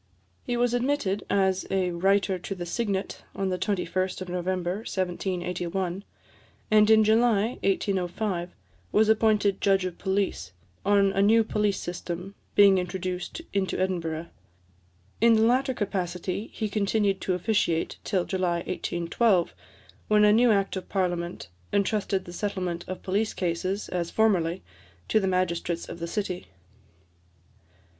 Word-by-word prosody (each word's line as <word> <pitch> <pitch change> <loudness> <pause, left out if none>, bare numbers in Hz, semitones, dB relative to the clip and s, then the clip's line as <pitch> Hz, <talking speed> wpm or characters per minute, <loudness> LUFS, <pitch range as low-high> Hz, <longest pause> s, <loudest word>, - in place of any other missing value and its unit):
He 245 - -2
was 245 0 +2
admitted 245 -6 0
as 190 -1 +1
a 185 -2 +1
Writer 195 +2 +1
to 195 +2 -5
the 175 -1 -5
Signet 200 0 -2
on 195 -1 -1
the 180 -1 -2
21st 185 -2 -1
of 185 - -6
November 180 0 -2
1781; 180 -1 -3 0.7
and 215 0 +6
in 220 0 +7
July 225 +1 +2
1805 190 -1 -1 0.4
was 215 +1 +4
appointed 215 -3 +3
Judge 195 -2 +3
of 180 -2 -5
Police, 190 - -1 0.3
on 200 0 +4
a 195 - +2
new 225 +3 +5
police 210 -2 0
system 180 +2 -5 0.2
being 200 -2 +7
introduced 185 - -4
into 195 -1 0
Edinburgh. 170 -3 -1 1.0
In 230 0 +6
the 220 - +4
latter 255 +3 +2
capacity 185 0 -3
he 215 - -3
continued 200 -1 0
to 185 - 0
officiate 180 -4 0
till 185 -4 0
July 175 -3 -1
1812, 175 +2 0 0.5
when 210 0 +5
a 210 - +6
new 240 +2 +5
Act 195 -2 +1
of 190 - -6
Parliament 175 - -2 0.2
entrusted 200 -1 0
the 175 - -9
settlement 180 -3 -3
of 185 - -6
police 205 +3 0
cases, 185 +3 -2
as 175 -2 -2
formerly, 190 -5 +1 0.5
to 220 - +4
the 195 - -1
magistrates 175 -2 -1
of - - -8
the 170 - -4
city. 185 -1 -3
190 Hz, 135 wpm, -27 LUFS, 180-210 Hz, 1.0 s, in